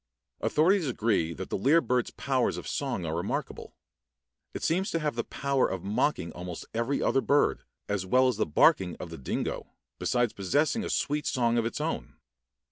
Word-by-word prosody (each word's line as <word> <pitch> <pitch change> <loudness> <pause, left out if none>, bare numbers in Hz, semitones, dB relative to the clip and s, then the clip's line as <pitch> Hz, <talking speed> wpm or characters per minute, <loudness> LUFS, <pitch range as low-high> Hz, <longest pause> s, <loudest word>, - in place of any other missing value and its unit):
Authorities 175 +2 +3
agree 110 -9 +1
that 95 - -7
the - - 0
lyre 145 - +5
bird's 125 -6 0
powers 130 -3 0
of - - -7
song 130 -11 -2
are 80 0 -2
remarkable. 85 +3 -4 0.8
It - - -6
seems 185 +5 +1
to 165 - 0
have 150 -1 -1
the 120 0 -2
power 140 -1 0
of 95 -2 -4
mocking 105 - 0
almost 90 0 -7
every 115 +5 0
other 135 - +2
bird, 145 +2 +2 0.3
as 100 -2 -1
well 130 +7 +4
as 125 -5 0
the 110 - 0
barking 90 +4 +4
of 85 - -8
the 80 - -8
dingo, 65 - -3 0.3
besides 120 -2 +1
possessing 145 - +1
a - - -4
sweet 150 0 0
song 120 -2 +2
of 115 - 0
its 115 - -5
own. - - -3
120 Hz, 185 wpm, -28 LUFS, 95-140 Hz, 0.8 s, lyre